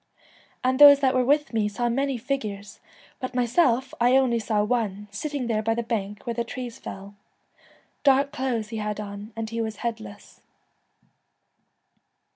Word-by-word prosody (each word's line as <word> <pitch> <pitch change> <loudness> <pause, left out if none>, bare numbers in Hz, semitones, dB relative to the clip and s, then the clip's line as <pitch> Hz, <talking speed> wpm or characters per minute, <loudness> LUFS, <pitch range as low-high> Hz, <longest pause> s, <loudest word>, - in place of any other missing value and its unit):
And 260 +1 +1
those 285 -1 +10
that 265 -1 +3
were 255 -1 +2
with 290 +1 +1
me 215 -2 +1
saw 240 +4 -2
many 270 +2 0
figures, 210 -6 -4 0.4
but 255 -1 -5
myself 250 +1 +2
I 245 +2 +5
only 250 -3 +2
saw 215 -2 0
one, 210 -3 -2
sitting 285 +5 -4
there 220 -2 0
by 225 +1 0
the 235 - -2
bank 210 -3 -4
where 235 - -2
the 235 0 -1
trees 245 -1 -7
fell. 195 +1 -9 0.9
Dark 280 0 +4
clothes 240 -5 -2
he 225 - -5
had 210 -1 -3
on, 205 +1 -7
and 225 0 -5
he 230 0 -2
was 220 -1 -3
headless.' 220 -3 -6
235 Hz, 160 wpm, -25 LUFS, 215-260 Hz, 0.9 s, those